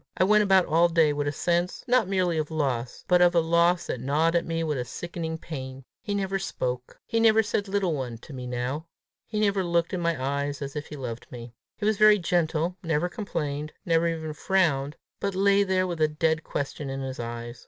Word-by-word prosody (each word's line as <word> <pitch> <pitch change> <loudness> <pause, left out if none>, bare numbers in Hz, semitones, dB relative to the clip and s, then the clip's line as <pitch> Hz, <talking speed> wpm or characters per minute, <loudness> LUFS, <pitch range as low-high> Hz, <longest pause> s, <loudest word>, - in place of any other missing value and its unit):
I - - +4
went 210 +2 +5
about 190 -3 +4
all 170 +2 +3
day 165 -3 +3
with 145 0 -2
a - - +1
sense 175 +4 -1
not 245 -4 +3
merely 180 -4 +1
of 150 - -2
loss, 130 -6 -2
but 180 -1 +4
of 175 0 +5
a - - +6
loss 170 +1 +3
that 125 - -3
gnawed 155 +6 +1
at 170 - +1
me 165 0 -1
with 150 -4 -1
a - - -1
sickening 165 +4 -5
pain. 135 -5 -7 0.2
He 205 -3 -3
never 195 -1 -1
spoke. 125 -8 -4
He 230 - 0
never 220 -1 +5
said 205 -1 -1
little 195 -3 0
one 125 -5 -4
to 140 - -12
me 125 -1 -6
now! 125 +6 -3 0.4
he 215 - -3
never 200 -2 +2
looked 170 0 0
in 180 - -1
my 170 -3 0
eyes 140 +2 -2
as 140 -1 -6
if 150 0 -4
he 150 - -8
loved 120 -4 -7
me! 120 -1 -9 0.2
He 205 - -3
was 215 -1 +1
very 215 0 +7
gentle, 170 -1 0
never 165 0 0
complained, 150 -8 -4
never 165 0 +3
even 160 -2 -3
frowned, 150 -4 +1 0.2
but 200 -1 -2
lay 200 +1 +4
there 190 -2 +2
with 170 -3 -4
a 155 - +5
dead 160 +1 0
question 140 0 -4
in 135 0 -4
his 130 -1 -5
eyes. 120 +1 -6
165 Hz, 220 wpm, -26 LUFS, 140-185 Hz, 0.4 s, very